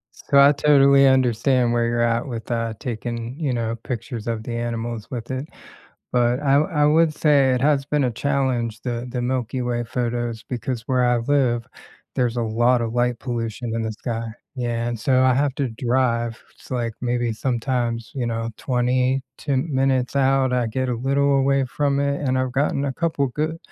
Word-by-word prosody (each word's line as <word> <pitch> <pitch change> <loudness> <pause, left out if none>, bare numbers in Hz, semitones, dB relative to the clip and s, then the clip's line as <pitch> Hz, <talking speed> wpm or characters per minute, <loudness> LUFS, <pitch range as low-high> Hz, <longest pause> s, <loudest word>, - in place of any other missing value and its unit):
so, 140 - +2
I 140 +1 +8
totally 140 -1 +5
understand 125 -1 +3
where 120 0 +1
you're 120 0 0
at 115 +3 0
with, 115 -2 -6
uh, 115 -1 -1
taking, 120 0 -4
you 145 -5 0
know, 115 -2 -1
pictures 120 -2 -5
of 110 -1 -2
the 120 - -5
animals 115 -1 -4
with 120 0 -5
it, 130 +3 -4 0.7
but 120 0 +2
I 135 -1 +2
w 150 - +1
I 150 -2 +2
would 155 +1 +4
say 140 -4 +3
it 125 - -1
has 140 -1 +2
been 150 -1 +1
a 125 - +1
challenge- 130 -4 -1
the 120 -1 -3
the 125 0 -3
Milky 125 0 -2
Way 120 -1 -1
photos, 120 -1 -3
because 120 -1 -3
where 130 -1 +2
I 120 - +3
live, 120 -2 +1 0.5
there's 120 -2 0
a 120 - 0
lot 120 +2 +2
of 115 -1 -3
light 120 0 0
pollution 115 -2 -4
in 115 - -1
the 110 -1 -2
sky 115 +1 -4 0.3
yeah, 120 -2 -2
and 120 -1 -3
so 130 +3 +2
I 130 -1 +4
have 140 0 +1
to 140 -3 -1
drive, 120 -1 0 0.2
it's, - - -18
like, 120 -3 -2
maybe, 120 -1 0
sometimes, 120 -1 -2
you 125 -3 -2
know, 115 0 -2
22 130 +2 0
minutes 135 -3 0
out 135 -1 +3
I 125 -2 +1
get 130 +4 -2
a - - 0
little 140 +3 +2
away 135 0 +2
from 140 +2 0
it, 140 0 0
and 130 -2 0
I've 130 -1 -1
gotten 140 +1 0
a 135 - -1
couple 155 -3 0
good 155 +5 -2
125 Hz, 190 wpm, -22 LUFS, 120-135 Hz, 0.7 s, I